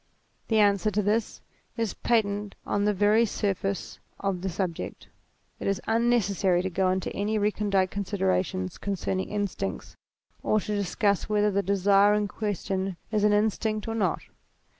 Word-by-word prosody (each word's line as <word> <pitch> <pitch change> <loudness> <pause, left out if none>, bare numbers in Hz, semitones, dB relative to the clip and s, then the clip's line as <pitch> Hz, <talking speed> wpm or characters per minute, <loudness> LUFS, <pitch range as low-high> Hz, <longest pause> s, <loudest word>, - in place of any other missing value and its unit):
The 220 - +2
answer 205 0 +4
to 210 0 0
this 215 +3 0 0.4
is 225 -3 -1
patent 205 -3 0
on 205 0 0
the 210 - +3
very 210 +3 +4
surface 195 -2 -2 0.2
of 195 -3 -2
the 190 - -2
subject. 180 -2 -4 0.5
It - - -4
is 195 -1 +1
unnecessary 205 -6 +2
to 190 - -2
go 185 +1 +1
into 185 0 -2
any 210 +2 0
recondite 205 -2 +1
considerations 185 -2 -1
concerning 190 -1 -2
instincts, 200 - -3 0.5
or 215 - +2
to 210 - -4
discuss 200 0 0
whether 210 0 +2
the 200 +1 +1
desire 200 +1 +4
in 210 -1 0
question 195 -3 -3
is 210 -2 +1
an 210 0 +4
instinct 215 +1 0
or 225 - -2
not. 195 -7 0
200 Hz, 150 wpm, -27 LUFS, 190-210 Hz, 0.5 s, answer